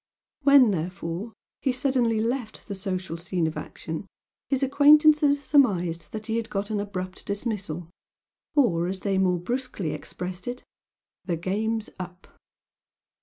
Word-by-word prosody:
When, 275 -5 +7
therefore, 180 +4 -4 0.3
he 265 - +2
suddenly 250 -4 +1
left 230 0 -3
the 205 - -4
social 185 -3 -3
scene 175 0 -1
of 160 - -2
action, 160 +3 -6 0.4
his 270 -1 +1
acquaintances 290 +1 +6
surmised 180 - +2
that 215 0 -6
he 225 0 -1
had 230 -1 -3
got 200 +1 -2
an 210 - 0
abrupt 185 -2 -3
dismissal, 200 -6 -3 0.7
or 175 - +3
as 190 0 -3
they 195 -2 +1
more 180 -2 +3
brusquely 200 - -3
expressed 180 +6 -6
it 245 +1 -4 0.6
"the 175 -3 -1
game's 215 +5 -1
up"! 180 0 -8
200 Hz, 135 wpm, -26 LUFS, 180-250 Hz, 0.7 s, When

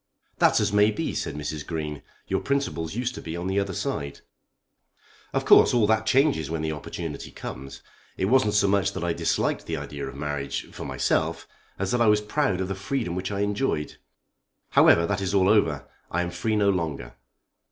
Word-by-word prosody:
"That's - - +5
as - - 0
may 105 +1 +5
be," 155 +10 -2
said 80 -3 -3
Mrs. 75 0 -4
Green. 75 -3 -4 0.3
"Your - - 0
principles 140 - -2
used 125 +1 -1
to - - -8
be 80 +1 -5
on 85 - -4
the 95 +1 +1
other 100 -2 -2
side." 70 -1 -3 1.1
"Of - - -1
course - - +7
all 115 -3 +4
that 110 +1 +1
changes 135 - +3
when 80 -1 -2
the 80 - -1
opportunity 75 -2 -6
comes. 70 +1 -8 0.3
It 95 - 0
wasn't 110 -1 +3
so 100 -1 +4
much 100 0 +2
that - - -4
I 85 -1 0
disliked - - -1
the - - -2
idea 70 -1 -6
of - - -8
marriage, 75 -2 -3
for - - -7
myself, - - -1 0.3
as 95 -1 -2
that 125 - +1
I 115 - +5
was 105 0 +5
proud 105 -3 0
of 95 - -1
the 95 - -2
freedom 105 0 -3
which 95 +3 -3
I 100 0 -2
enjoyed. 100 - -1 0.7
However 85 - +6
that 100 +1 -1
is 95 +1 -1
all 95 -1 +4
over. 80 -10 +2 0.2
I 90 +1 0
am 90 - -4
free 100 +5 -1
no 100 -1 +3
longer." 75 -9 -3
95 Hz, 200 wpm, -25 LUFS, 80-105 Hz, 1.1 s, course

